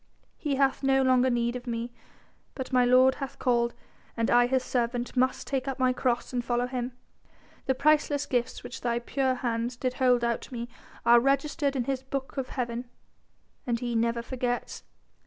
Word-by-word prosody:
He 290 Hz, -3 st, -1 dB
hath 270 Hz, -1 st, +2 dB
no 270 Hz, -1 st, +3 dB
longer 255 Hz, 0 st, +4 dB
need 240 Hz, 0 st, 0 dB
of 250 Hz, 0 st, -7 dB
me 235 Hz, 0 st, -3 dB, 0.6 s
but 260 Hz, -1 st, -6 dB
my 250 Hz, -1 st, +5 dB
Lord 255 Hz, +1 st, +6 dB
hath 275 Hz, 0 st, -5 dB
called 235 Hz, -2 st, +1 dB, 0.4 s
and 230 Hz, 0 st, +1 dB
I 245 Hz, 0 st, +5 dB
His 260 Hz, 0 st, +1 dB
servant 245 Hz, 0 st, -2 dB
must 255 Hz, +1 st, +1 dB
take 270 Hz, -1 st, -2 dB
up 270 Hz, -, -2 dB
my 255 Hz, -1 st, +2 dB
cross 250 Hz, 0 st, -1 dB
and 245 Hz, -1 st, -1 dB
follow 240 Hz, 0 st, 0 dB
Him. 250 Hz, 0 st, -4 dB, 0.7 s
The 265 Hz, -, +2 dB
priceless 295 Hz, 0 st, +2 dB
gifts 250 Hz, 0 st, -2 dB
which -, -, -8 dB
thy 235 Hz, -1 st, 0 dB
pure 260 Hz, +2 st, 0 dB
hands 240 Hz, 0 st, -2 dB
did 255 Hz, 0 st, -1 dB
hold 250 Hz, -2 st, +3 dB
out 235 Hz, -1 st, 0 dB
to -, -, -11 dB
me 235 Hz, 0 st, -5 dB, 0.4 s
are 235 Hz, 0 st, +7 dB
registered 275 Hz, +2 st, +1 dB
in 255 Hz, -, 0 dB
His 265 Hz, +1 st, -2 dB
book 265 Hz, 0 st, -5 dB
of 270 Hz, -2 st, -3 dB
Heaven, 240 Hz, -1 st, -4 dB, 0.8 s
and 235 Hz, -1 st, 0 dB
He 240 Hz, -1 st, -3 dB
never 235 Hz, +1 st, +1 dB
forgets. 245 Hz, -1 st, -3 dB
250 Hz, 185 wpm, -28 LUFS, 240-265 Hz, 0.8 s, are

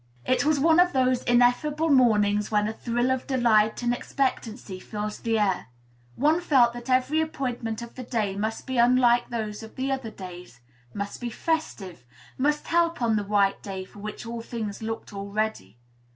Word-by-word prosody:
It 255 Hz, -, +2 dB
was 300 Hz, 0 st, +2 dB
one 320 Hz, +3 st, +4 dB
of 360 Hz, 0 st, +4 dB
those 255 Hz, -1 st, +2 dB
ineffable 245 Hz, +6 st, +3 dB
mornings, 210 Hz, -6 st, +3 dB
when 210 Hz, -1 st, +1 dB
a 220 Hz, -, -3 dB
thrill 240 Hz, +3 st, -1 dB
of 260 Hz, -1 st, -2 dB
delight 235 Hz, -4 st, +2 dB
and 240 Hz, 0 st, +2 dB
expectancy 240 Hz, -6 st, -3 dB
fills 210 Hz, +2 st, -5 dB
the 225 Hz, -1 st, 0 dB
air; 195 Hz, -4 st, 0 dB, 0.5 s
one 310 Hz, +5 st, +2 dB
felt 255 Hz, -8 st, +4 dB
that 240 Hz, +1 st, -9 dB
every 260 Hz, +5 st, +2 dB
appointment 245 Hz, -7 st, -3 dB
of 235 Hz, -, -10 dB
the 255 Hz, -, -8 dB
day 225 Hz, -5 st, -2 dB
must 220 Hz, +2 st, -3 dB
be 260 Hz, -2 st, -1 dB
unlike 240 Hz, 0 st, +4 dB
those 215 Hz, -3 st, -4 dB
of 220 Hz, 0 st, -12 dB
other 265 Hz, -3 st, -2 dB
days, 180 Hz, -, -10 dB, 0.4 s
must 200 Hz, +3 st, -5 dB
be 240 Hz, -, -3 dB
festive, 215 Hz, -, -3 dB, 0.3 s
must 295 Hz, +3 st, 0 dB
help 335 Hz, 0 st, +2 dB
on 230 Hz, -3 st, +2 dB
the 210 Hz, -, 0 dB
"white 200 Hz, -1 st, +1 dB
day" 190 Hz, -2 st, -6 dB
for 205 Hz, -, -15 dB
which 210 Hz, +3 st, -7 dB
all 230 Hz, 0 st, -5 dB
things 225 Hz, -3 st, -5 dB
looked 225 Hz, 0 st, -5 dB
ready. 200 Hz, -, -3 dB
235 Hz, 175 wpm, -26 LUFS, 210-260 Hz, 0.5 s, one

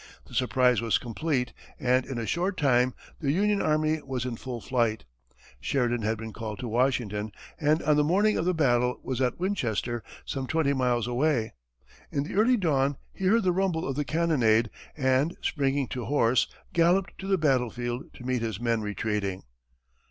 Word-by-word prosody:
The -, -, -16 dB
surprise 125 Hz, -2 st, +3 dB
was 115 Hz, -2 st, +2 dB
complete, 125 Hz, +1 st, -2 dB, 0.3 s
and 130 Hz, -2 st, +2 dB
in 135 Hz, -, -4 dB
a 115 Hz, -, -2 dB
short 180 Hz, -, -1 dB
time 125 Hz, -3 st, +3 dB, 0.2 s
the 140 Hz, -4 st, 0 dB
Union 205 Hz, +5 st, +2 dB
army 155 Hz, 0 st, +1 dB
was 130 Hz, -3 st, -4 dB
in 125 Hz, -2 st, -3 dB
full 125 Hz, +1 st, -6 dB
flight. 115 Hz, -, 0 dB, 0.5 s
Sheridan 120 Hz, -, 0 dB
had 110 Hz, +1 st, 0 dB
been 110 Hz, 0 st, -7 dB
called 110 Hz, -2 st, -5 dB
to 125 Hz, -, -5 dB
Washington, 115 Hz, -3 st, 0 dB, 0.3 s
and 155 Hz, +2 st, +2 dB
on 150 Hz, 0 st, +3 dB
the 150 Hz, -, +4 dB
morning 200 Hz, +7 st, +3 dB
of 160 Hz, -, 0 dB
the 180 Hz, -, +2 dB
battle 125 Hz, -5 st, +2 dB
was 130 Hz, -1 st, -3 dB
at 125 Hz, +4 st, 0 dB
Winchester, 120 Hz, -, -1 dB, 0.2 s
some 135 Hz, -2 st, -3 dB
twenty 155 Hz, -1 st, +1 dB
miles 125 Hz, -3 st, +1 dB
away. 125 Hz, -2 st, 0 dB, 0.6 s
In 140 Hz, -, 0 dB
the 150 Hz, -, -7 dB
early 230 Hz, +5 st, +4 dB
dawn, 140 Hz, -7 st, +1 dB, 0.2 s
he 190 Hz, -, -4 dB
heard 225 Hz, +4 st, +4 dB
the 185 Hz, -, +3 dB
rumble 180 Hz, -3 st, 0 dB
of 135 Hz, -, -2 dB
the 150 Hz, -, 0 dB
cannonade, 125 Hz, -9 st, +2 dB, 0.3 s
and, 135 Hz, +4 st, +1 dB
springing 140 Hz, -2 st, 0 dB
to 125 Hz, -3 st, -4 dB
horse, 130 Hz, -4 st, +3 dB, 0.3 s
galloped 175 Hz, +2 st, +2 dB
to 190 Hz, -, -6 dB
the 195 Hz, -1 st, +3 dB
battlefield, 125 Hz, -4 st, -1 dB
to 125 Hz, -, -11 dB
meet 130 Hz, -2 st, 0 dB
his 110 Hz, -4 st, -3 dB
men 115 Hz, -2 st, 0 dB
retreating. 105 Hz, -2 st, -2 dB
130 Hz, 180 wpm, -27 LUFS, 120-155 Hz, 0.6 s, the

